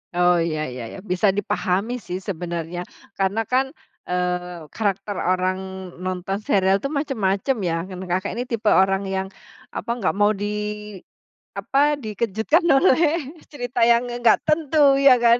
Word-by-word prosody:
Oh, 175 0 +4
ya 160 -2 -1
ya 125 -2 -6
ya. 150 - -9
Bisa 190 0 +1
dipahami, 200 +4 -1
sih, 185 -3 -6
sebenarnya. 175 -2 -4 0.3
Karena, 195 +3 +1
kan, 265 +5 0 0.3
eee, 180 -1 -2
karakter 200 -2 -2
orang 185 +1 0 0.4
nonton 185 +1 -3
serial 195 -2 +2
itu 275 - -2
macem-macem, 265 -5 0
ya, 165 -3 -1
kan. 185 0 -8
Kakak 185 +3 -1
ini 245 +2 -4
tipe 225 -3 +1
orang 195 +1 +3
yang, 190 0 -2 0.5
apa, - - -5
enggak 195 - 0
mau 205 +1 +4
di, 210 0 -4 0.6
apa, 290 +2 +2
dikejutkan 225 - 0
oleh 305 0 +3 0.2
cerita 245 -4 -5
yang 235 +1 +3
nge - - -4
enggak 235 -2 +5
tentu, 300 -3 +3
ya, 275 -2 +7
kan? 235 0 +6
205 Hz, 150 wpm, -22 LUFS, 185-245 Hz, 0.6 s, ya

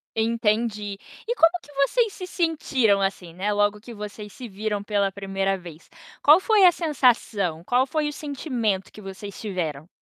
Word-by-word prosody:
Entendi. 220 -2 0 0.3
E 475 +2 -1
como 330 -7 +6
que 290 - -17 0.2
vocês 465 - +1
se 365 - -7
sentiram 280 - +1
assim, 195 -3 -2
né, 200 +4 -1
logo 205 0 +1
que 235 +3 -11
vocês 210 -1 -8
se 250 - -8
viram 205 +1 -3
pela 205 -1 +1
1º 195 0 -1
vez? 170 -3 -12 0.3
Qual 300 +4 +7
foi 420 -2 +5
a 355 - +8
sensação, 235 - +1
qual 250 +7 +2
foi 300 +1 0
o - - -6
sentimento 250 - -2
que 215 - -12
vocês 195 0 -8
tiveram? 165 -8 -4
210 Hz, 170 wpm, -24 LUFS, 195-275 Hz, 0.3 s, a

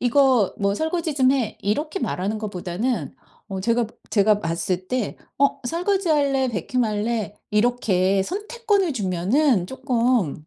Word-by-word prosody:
이거 250 -4 +3
뭐 200 0 +1
설거지 320 +2 -1
좀 260 -2 +4
해." 250 -6 -1
이렇게 295 - -1
말하는 205 - -2
것보다는 195 - -3 0.3
어 190 -1 -4
제가 230 +3 +1 0.2
제가 210 0 +3
봤을 175 +2 -2
때 250 -5 -2 0.2
어 280 0 +2
"설거지할래, 315 -6 +1
vacuum 240 +3 -1
할래?" 215 0 -2 0.2
이렇게 200 -4 +2
선택권을 410 - -1
주면은 200 - +1
쪼끔 240 - 0
235 Hz, 300 characters per minute, -23 LUFS, 195-280 Hz, 0.3 s, 좀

